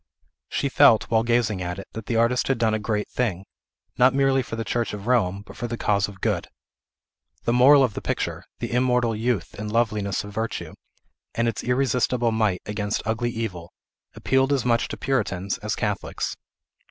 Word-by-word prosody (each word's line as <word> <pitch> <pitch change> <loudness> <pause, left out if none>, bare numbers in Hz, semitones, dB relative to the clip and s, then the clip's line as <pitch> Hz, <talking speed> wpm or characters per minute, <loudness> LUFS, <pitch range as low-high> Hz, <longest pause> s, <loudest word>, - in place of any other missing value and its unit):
She 140 - -1
felt, 115 -5 +5
while 110 -1 +4
gazing 115 -4 +1
at 90 +1 -3
it, 100 - -8
that 110 -1 -7
the 115 - -1
artist 115 +2 +2
had 135 - +1
done 115 -2 +2
a 110 - 0
great 105 0 -2
thing, 100 -7 -2 0.5
not 130 +2 +5
merely 135 -1 +3
for 115 - -6
the 115 - -3
Church 115 -1 -1
of 100 0 -9
Rome, 100 -6 +1
but - - -12
for 120 - -4
the 120 0 -4
cause 100 -3 +1
of 100 -2 -12
Good. - - 0 1.0
The 115 - +1
moral 135 +3 +7
of 125 -5 +1
the - - -5
picture, - - -3
the - - -5
immortal 125 -2 +2
youth 110 -4 -1
and 105 0 -4
loveliness 105 -4 0
of 105 0 -9
virtue, 110 +1 -4 0.6
and 115 0 +1
its 115 - -2
irresistibles 125 -2 +1
might 105 -5 0
against 105 0 -2
ugly 115 +2 0
Evil, 100 -8 -5 0.4
appealed 135 +1 +1
as 135 -3 +1
much 115 -1 +2
to - - -6
Puritans 100 -6 -1
as 105 -1 -2
Catholics. 105 -3 -3
115 Hz, 190 wpm, -24 LUFS, 105-125 Hz, 1.0 s, moral